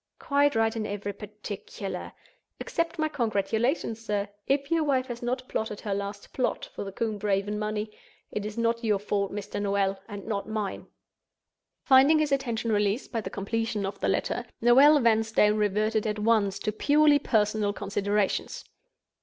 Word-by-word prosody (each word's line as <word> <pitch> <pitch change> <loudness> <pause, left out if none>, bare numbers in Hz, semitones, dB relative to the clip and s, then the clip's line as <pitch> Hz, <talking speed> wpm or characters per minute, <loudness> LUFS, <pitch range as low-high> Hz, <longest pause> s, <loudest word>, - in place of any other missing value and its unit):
Quite 285 -1 +2
right 225 0 +2
in 215 -1 -2
every 205 0 -4
particular. 205 -1 -7 0.5
Accept 335 0 -2
my 310 0 +1
congratulations, 230 - -1
sir. 205 -2 -1 0.2
If 275 +2 0
your 330 -1 +3
wife 265 -3 +1
has 240 -2 -7
not 255 +1 -2
plotted 215 -2 -3
her 205 -3 -2
last 200 +1 -5
plot 255 - -1
for - - -5
the 195 - -6
Combe 215 +1 -2
Raven 205 +1 0
money, 215 0 -3 0.4
it 210 - -3
is 210 +1 -6
not 230 0 0
your 215 -3 +2
fault, 200 0 -1
Mr. 205 0 -4
Noel—and 200 0 -2
not 210 -1 -3
mine!" 215 -3 -3 1.0
Finding 275 +3 +6
his 305 -2 +1
attention 235 -4 0
released 210 +3 0
by 230 -2 -1
the - - -5
completion 220 0 -2
of 195 +1 -5
the - - 0
letter, 245 - 0 0.2
Noel 275 +6 +7
Vanstone 220 -3 +3
reverted 215 +1 +1
at 210 0 -1
once 210 -2 +2
to 215 - -2
purely 290 +6 +4
personal 215 -5 +1
considerations. 205 0 -1
215 Hz, 160 wpm, -27 LUFS, 205-240 Hz, 1.0 s, Noel